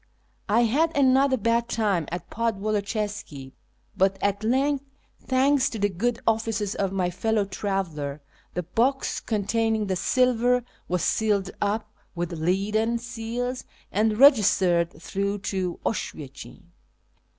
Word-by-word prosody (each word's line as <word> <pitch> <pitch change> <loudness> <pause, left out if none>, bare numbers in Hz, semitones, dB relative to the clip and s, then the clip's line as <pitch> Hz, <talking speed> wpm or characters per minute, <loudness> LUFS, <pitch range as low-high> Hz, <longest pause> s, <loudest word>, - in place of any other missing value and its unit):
I 220 +3 +4
had 290 +8 +2
another 265 0 +4
bad 230 +1 +1
time 200 -9 0
at 175 +1 -5
Podwoloczyska, 210 - -2 0.4
but 190 +1 +2
at 205 +1 -1
length, 270 +4 +1 0.4
thanks 270 +1 +3
to 230 - -6
the 205 -1 +1
good 225 +6 -1
ofiices 220 -2 0
of 195 -2 -1
my 185 -2 0
fellow 215 +3 0
traveller, 185 -8 -3 0.4
the 180 - -1
box 245 - 0
con 215 -3 -2
tainmg 220 0 0
the 190 - +1
silver 250 +4 +2 0.2
was 180 0 -1
sealed 205 -3 +1
up 210 +2 -1 0.2
with 175 0 -3
leaden 200 +8 0
seals 245 +1 -4 0.3
and 215 +1 +1
registered 190 - +5
through 200 +4 -2 0.2
to 185 -2 -2
Oswiecim. 145 -10 -5
215 Hz, 125 wpm, -25 LUFS, 190-235 Hz, 0.4 s, registered